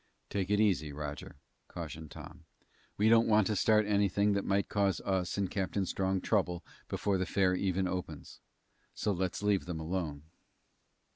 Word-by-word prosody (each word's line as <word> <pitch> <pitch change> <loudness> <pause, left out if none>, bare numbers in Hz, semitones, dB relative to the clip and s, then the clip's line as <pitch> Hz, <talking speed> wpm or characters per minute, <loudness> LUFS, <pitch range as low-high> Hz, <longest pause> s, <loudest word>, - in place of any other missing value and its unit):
"Take 95 -2 -1
it 105 0 +2
easy, 95 -8 +2
Roger," 75 0 -6 0.3
cautioned 80 -2 -7
Tom. 85 +3 -11 0.5
"We 105 - +3
don't 115 0 +5
want 110 -2 +4
to 105 - 0
start 110 +2 +4
anything 100 0 +2
that 100 -1 0
might 100 +1 +1
cause 100 -2 +1
us 95 -1 -1
and 100 -1 +1
Captain 95 +1 -1
Strong 95 +1 -1
trouble 90 -5 0 0.2
before 100 -2 0
the 95 - -1
fair 95 -2 +2
even 95 0 0
opens. 90 -5 -6 0.6
So 105 - 0
let's 95 +1 -2
leave 105 -2 +2
them 85 -3 -4
alone." 80 -3 -3
95 Hz, 160 wpm, -32 LUFS, 85-100 Hz, 0.6 s, don't